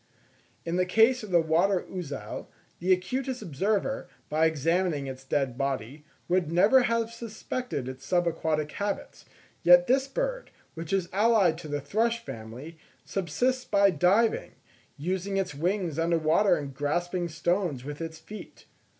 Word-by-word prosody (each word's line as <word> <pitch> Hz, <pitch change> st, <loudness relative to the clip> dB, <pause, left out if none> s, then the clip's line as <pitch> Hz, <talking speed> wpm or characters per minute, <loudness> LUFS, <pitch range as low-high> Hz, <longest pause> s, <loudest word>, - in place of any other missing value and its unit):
In 170 Hz, +1 st, -1 dB
the 180 Hz, -, +2 dB
case 225 Hz, +6 st, +4 dB
of 215 Hz, -, -8 dB
the 175 Hz, -2 st, +4 dB
water 170 Hz, +4 st, +2 dB
ouzel, 175 Hz, -7 st, -6 dB, 0.3 s
the 180 Hz, +2 st, +1 dB
acutest 250 Hz, +7 st, 0 dB
observer, 205 Hz, -, -1 dB, 0.2 s
by 155 Hz, +2 st, +3 dB
examining 160 Hz, 0 st, 0 dB
its 130 Hz, 0 st, -7 dB
dead 135 Hz, -2 st, -1 dB
body, 135 Hz, +1 st, -3 dB, 0.2 s
would 175 Hz, -3 st, +1 dB
never 205 Hz, +10 st, +5 dB
have 230 Hz, -1 st, 0 dB
suspected 230 Hz, -, -5 dB
its 130 Hz, +1 st, -7 dB
sub 175 Hz, +3 st, +1 dB
aquatic 155 Hz, -2 st, -1 dB
habits; 200 Hz, 0 st, -4 dB, 0.4 s
yet 175 Hz, 0 st, +7 dB
this 265 Hz, +4 st, +2 dB
bird, -, -, -3 dB, 0.2 s
which 165 Hz, -1 st, -7 dB
is 190 Hz, -3 st, +1 dB
allied 200 Hz, -5 st, +3 dB
to 160 Hz, -, -8 dB
the 145 Hz, -1 st, -3 dB
thrush 230 Hz, +9 st, 0 dB
family, 125 Hz, -, -8 dB, 0.3 s
subsists 220 Hz, +9 st, -1 dB
by 200 Hz, -4 st, +4 dB
diving,—using 190 Hz, -2 st, -1 dB
its 190 Hz, -3 st, -1 dB
wings 170 Hz, +1 st, -1 dB
under 165 Hz, +1 st, +2 dB
water 165 Hz, +6 st, +3 dB
and 140 Hz, -2 st, -5 dB
grasping 175 Hz, +6 st, -1 dB
stones 165 Hz, -3 st, -1 dB
with 145 Hz, +2 st, -6 dB
its 160 Hz, -1 st, -5 dB
feet. 215 Hz, +5 st, -11 dB
175 Hz, 145 wpm, -28 LUFS, 155-205 Hz, 0.4 s, yet